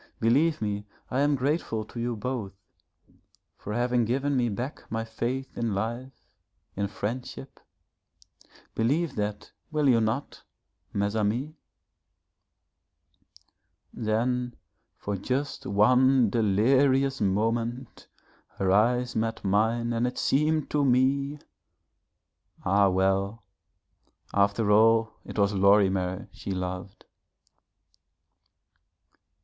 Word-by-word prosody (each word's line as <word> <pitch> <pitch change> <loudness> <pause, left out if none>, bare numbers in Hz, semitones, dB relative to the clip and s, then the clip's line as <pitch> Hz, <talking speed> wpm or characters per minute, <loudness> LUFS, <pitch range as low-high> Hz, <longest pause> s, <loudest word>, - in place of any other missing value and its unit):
Believe 145 +5 +2
me, 105 0 -3 0.2
I 130 - 0
am 145 +1 +3
grateful 130 -5 -1
to 120 - -9
you 120 0 -2
both 110 -3 -4 1.0
for 105 - -8
having 120 +2 +1
given 135 +5 0
me 120 -2 +1
back 120 +7 -5
my 115 0 -1
faith 120 +4 -4
in 115 -4 -1
life, 120 +6 -5 0.5
in 100 0 -1
friendship, 120 +6 -6 1.1
believe 145 +7 0
that, 105 0 -3 0.2
will 150 -3 +1
you 120 -3 +4
not, 110 +6 -2 0.5
mes 100 +1 -1
amis?' 115 +8 -1 2.4
Then 120 +3 -1 0.4
for 100 - -3
just 135 +8 -3
one 125 +3 +4
delirious 130 +6 +2
moment 115 +5 -1 0.5
her 95 -1 +1
eyes 120 +5 +2
met 115 0 -2
mine 115 +4 +1
and 115 +1 +1
it 125 - -5
seemed 155 +2 +1
to 145 -1 +2
me 140 +2 +2 1.3
ah, 100 +1 +4
well, 95 +3 0 0.9
after 100 +2 +2
all 110 +1 +4
it - - -9
was 100 0 +2
Lorimer 95 -2 +2
she - - -9
loved. 90 +1 -5
115 Hz, 100 wpm, -27 LUFS, 105-130 Hz, 2.4 s, you